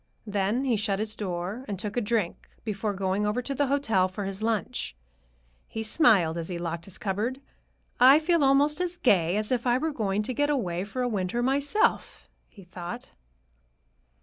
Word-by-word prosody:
Then 205 Hz, +5 st, 0 dB
he 245 Hz, -4 st, +2 dB
shut 200 Hz, -1 st, 0 dB
his 215 Hz, +1 st, -3 dB
door 190 Hz, +4 st, -4 dB
and 200 Hz, -2 st, -3 dB
took 210 Hz, +2 st, -5 dB
a 245 Hz, -, +1 dB
drink 210 Hz, -5 st, -2 dB
before 210 Hz, -1 st, -2 dB
going 190 Hz, +1 st, 0 dB
over 210 Hz, +4 st, 0 dB
to 275 Hz, -, -3 dB
the 285 Hz, +1 st, +1 dB
hotel 225 Hz, -9 st, +2 dB
for 190 Hz, +2 st, -5 dB
his 195 Hz, +1 st, -5 dB
lunch. 220 Hz, -, -2 dB, 0.7 s
He 220 Hz, -, -5 dB
smiled 210 Hz, -, +3 dB
as 165 Hz, -, -4 dB
he 180 Hz, -, -3 dB
locked 170 Hz, -1 st, -4 dB
his 195 Hz, -, -5 dB
cupboard. 215 Hz, +6 st, -2 dB, 0.6 s
"I 260 Hz, +4 st, +8 dB
feel 325 Hz, 0 st, +2 dB
almost 285 Hz, +4 st, +3 dB
as 355 Hz, -1 st, -2 dB
gay 185 Hz, -, +3 dB
as 215 Hz, +2 st, -2 dB
if 250 Hz, -1 st, 0 dB
I 240 Hz, 0 st, +4 dB
were 315 Hz, +3 st, -1 dB
going 210 Hz, -4 st, -1 dB
to 255 Hz, -, -3 dB
get 290 Hz, +3 st, +1 dB
away 185 Hz, -10 st, -1 dB
for 250 Hz, +5 st, -3 dB
a -, -, +1 dB
winter 210 Hz, +1 st, -1 dB
myself," 280 Hz, -, +1 dB, 0.2 s
he 200 Hz, -, -15 dB
thought. 180 Hz, +5 st, -8 dB
215 Hz, 185 wpm, -27 LUFS, 190-260 Hz, 0.7 s, I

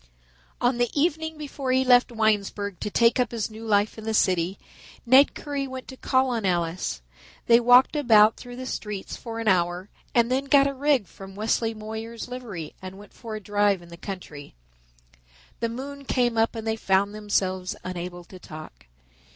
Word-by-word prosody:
On 245 Hz, 0 st, +1 dB
the 240 Hz, -1 st, +2 dB
evening 320 Hz, 0 st, 0 dB
before 280 Hz, -3 st, -4 dB
he 260 Hz, +1 st, +2 dB
left 245 Hz, -1 st, +5 dB
Winesburg 205 Hz, -3 st, 0 dB
to -, -, -3 dB
take 230 Hz, +4 st, +3 dB
up 245 Hz, -3 st, +2 dB
his 225 Hz, -2 st, -3 dB
new 220 Hz, +1 st, -10 dB
life 210 Hz, +1 st, +1 dB
in -, -, -9 dB
the 220 Hz, 0 st, -1 dB
city, 185 Hz, -1 st, +1 dB, 0.5 s
Ned 260 Hz, +4 st, +6 dB
Currie 285 Hz, -2 st, -4 dB
went 260 Hz, -1 st, -8 dB
to 260 Hz, -, -8 dB
call 260 Hz, 0 st, +1 dB
on 230 Hz, -3 st, -2 dB
Alice. 170 Hz, -, -1 dB, 0.4 s
They 235 Hz, 0 st, +6 dB
walked 245 Hz, +4 st, +5 dB
about 225 Hz, -6 st, +5 dB
through 245 Hz, -1 st, -10 dB
the 255 Hz, +1 st, -7 dB
streets 210 Hz, -5 st, -5 dB
for 230 Hz, -1 st, -7 dB
an 225 Hz, -, -4 dB
hour 180 Hz, 0 st, +1 dB, 0.3 s
and 235 Hz, 0 st, +3 dB
then 265 Hz, +2 st, +1 dB
got 275 Hz, 0 st, +5 dB
a 275 Hz, -, 0 dB
rig 275 Hz, -4 st, +1 dB
from 195 Hz, +1 st, -12 dB
Wesley 225 Hz, +2 st, 0 dB
Moyer's 220 Hz, +2 st, -7 dB
livery 230 Hz, -11 st, -7 dB
and 185 Hz, 0 st, -8 dB
went 205 Hz, +1 st, -14 dB
for 225 Hz, -2 st, -8 dB
a -, -, -4 dB
drive 205 Hz, -2 st, +1 dB
in 170 Hz, -, -15 dB
the 170 Hz, -, -10 dB
country. 170 Hz, -, -9 dB, 1.0 s
The 230 Hz, -, -1 dB
moon 275 Hz, +4 st, -7 dB
came 245 Hz, -3 st, +1 dB
up 225 Hz, +1 st, +1 dB
and 225 Hz, -1 st, -5 dB
they 220 Hz, 0 st, -1 dB
found 200 Hz, 0 st, +1 dB
themselves 190 Hz, -3 st, -1 dB
unable 175 Hz, -1 st, -6 dB
to 185 Hz, +2 st, -13 dB
talk. 110 Hz, -, -11 dB
220 Hz, 185 wpm, -25 LUFS, 195-250 Hz, 1.0 s, Ned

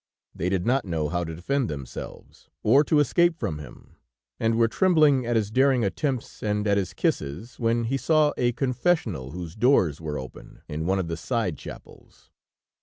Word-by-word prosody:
They 90 Hz, -, -2 dB
did 95 Hz, -1 st, -1 dB
not 130 Hz, +3 st, +2 dB
know 80 Hz, -5 st, -2 dB
how 90 Hz, +1 st, -1 dB
to 80 Hz, -1 st, -6 dB
defend 130 Hz, -, -1 dB
themselves, 70 Hz, -4 st, -9 dB
or 135 Hz, +7 st, +5 dB
to 155 Hz, -, +2 dB
escape 170 Hz, +4 st, +3 dB
from 90 Hz, -, -3 dB
him, 75 Hz, -5 st, -13 dB, 0.4 s
and 115 Hz, 0 st, +1 dB
were 115 Hz, 0 st, +4 dB
trembling 150 Hz, -4 st, +3 dB
at 120 Hz, -, 0 dB
his 105 Hz, -2 st, 0 dB
daring 130 Hz, -1 st, +3 dB
attempts, 130 Hz, +4 st, -3 dB
and 105 Hz, -1 st, -1 dB
at 100 Hz, -1 st, +3 dB
his 90 Hz, -4 st, -2 dB
kisses, 95 Hz, -, -2 dB
when 115 Hz, 0 st, +1 dB
he 130 Hz, +4 st, 0 dB
saw 155 Hz, +1 st, +3 dB
a 120 Hz, -1 st, +1 dB
confessional 125 Hz, -, 0 dB
whose 85 Hz, +1 st, -7 dB
doors 105 Hz, -, +3 dB
were 75 Hz, -2 st, -4 dB
open, 65 Hz, -1 st, -10 dB
in 80 Hz, +2 st, -4 dB
one 95 Hz, +1 st, +2 dB
of 95 Hz, -3 st, -2 dB
the 85 Hz, 0 st, -3 dB
side 110 Hz, -3 st, -1 dB
chapels. -, -, -13 dB
110 Hz, 180 wpm, -25 LUFS, 85-130 Hz, 0.4 s, or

